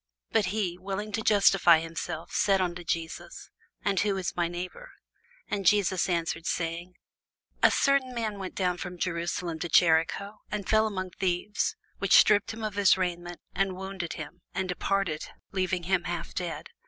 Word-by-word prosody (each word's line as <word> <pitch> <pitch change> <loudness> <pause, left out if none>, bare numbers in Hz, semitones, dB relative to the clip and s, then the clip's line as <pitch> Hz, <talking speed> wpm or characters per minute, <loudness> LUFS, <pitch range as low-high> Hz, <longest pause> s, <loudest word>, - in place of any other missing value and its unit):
But 225 -3 +3
he, 185 -3 -2
willing 195 +3 -4
to 220 +1 -1
justify 195 -5 +5
himself, 165 0 -5
said 195 -1 +3
unto 175 -1 -2
Jesus, 165 0 -4 0.3
And 200 -2 +2
who 205 -2 +1
is 185 -2 -3
my 175 -1 +1
neighbour? 180 - -7 0.5
And 200 -1 -2
Jesus 190 -1 +3
answering 165 -1 -1
said, 170 +2 -2 0.7
A - - +7
certain 275 -2 +2
man 220 -4 -3
went 190 -1 -6
down 180 -2 0
from 180 -1 -6
Jerusalem 170 -1 -2
to 175 - -3
Jericho, 170 +5 +3
and 205 -3 -4
fell 220 0 +4
among 185 -3 -4
thieves, 185 +3 -1 0.2
which 200 - +5
stripped 205 -1 +5
him 220 0 -7
of 215 -2 -2
his 200 -1 +4
raiment, 175 -1 -3
and 195 0 0
wounded 190 -2 -5
him, 180 - -8
and 190 -1 -1
departed, 180 -3 -1 0.2
leaving 185 -2 -1
him 180 +1 +1
half 175 -1 -4
dead. 175 -2 -4
185 Hz, 165 wpm, -28 LUFS, 175-200 Hz, 0.7 s, A